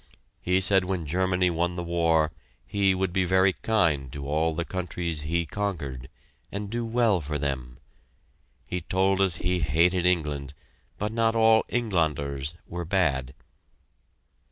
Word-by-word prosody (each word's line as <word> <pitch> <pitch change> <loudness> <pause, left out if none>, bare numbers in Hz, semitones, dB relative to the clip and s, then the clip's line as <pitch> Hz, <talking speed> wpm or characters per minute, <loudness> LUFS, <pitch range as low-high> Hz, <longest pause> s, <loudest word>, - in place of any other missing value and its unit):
He 90 +1 +2
said 95 -1 +4
when 90 -3 -2
Germany 90 +3 +1
won 85 +1 -1
the 90 - -3
war 80 -2 +2 0.3
"he" 100 -2 +2
would 95 -1 -1
be 95 -1 +2
very 95 +1 +3
kind 80 - +1
to 70 +1 -6
all 80 +2 0
the 85 - -2
countries 85 -4 -3
"he" 85 +3 -1
conquered, 75 -10 -4 0.4
and 100 0 -5
do 120 0 -2
well 115 -5 +2
for 75 +1 -3
them. 65 -4 -3 0.9
He 90 - -3
told 95 +1 +1
us 95 -3 +3
he 90 +1 0
hated 85 +4 +2
England, 75 -5 -1 0.4
but 105 +1 -2
not 115 0 +1
all 110 0 +5
"Engländers" 75 - -1
were 85 0 -5
bad! 70 -8 0
85 Hz, 145 wpm, -26 LUFS, 75-95 Hz, 0.9 s, all